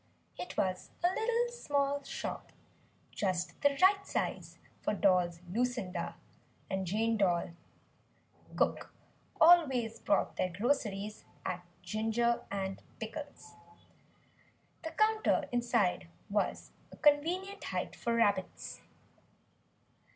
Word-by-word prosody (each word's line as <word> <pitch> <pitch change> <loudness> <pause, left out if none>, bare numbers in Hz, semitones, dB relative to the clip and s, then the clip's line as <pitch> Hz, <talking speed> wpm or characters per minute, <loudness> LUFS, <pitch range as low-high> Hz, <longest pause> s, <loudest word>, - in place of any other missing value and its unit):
It 360 - -7
was 185 -1 0
a 350 - +5
little 475 +2 +1
small 285 -9 0
shop - - -5 0.6
just 185 -3 -2
the 285 -1 +3
right 395 +1 +6
size - - -3 0.2
for 210 - 0
Dolls 180 -4 +3
Lucinda 205 -4 -2 0.6
and 190 -1 -1
Jane 225 +4 +1
Doll 175 -4 +2 1.0
cook - - 0 0.5
always 270 -9 +5
bought 200 - +1
their 185 - +1
groceries 210 0 -1 0.2
at 180 0 -3 0.2
Ginger 225 +5 +1
and 195 -1 -3 0.2
Pickles. 225 - -7 1.3
The 325 - -4
counter 435 +3 +2
inside 235 -8 +1 0.2
was 205 0 -1 0.2
a - - -12
convenient 350 +7 +2
height - - -3
for 235 -2 -1
rabbits. 205 -5 0
230 Hz, 100 wpm, -33 LUFS, 190-290 Hz, 1.3 s, right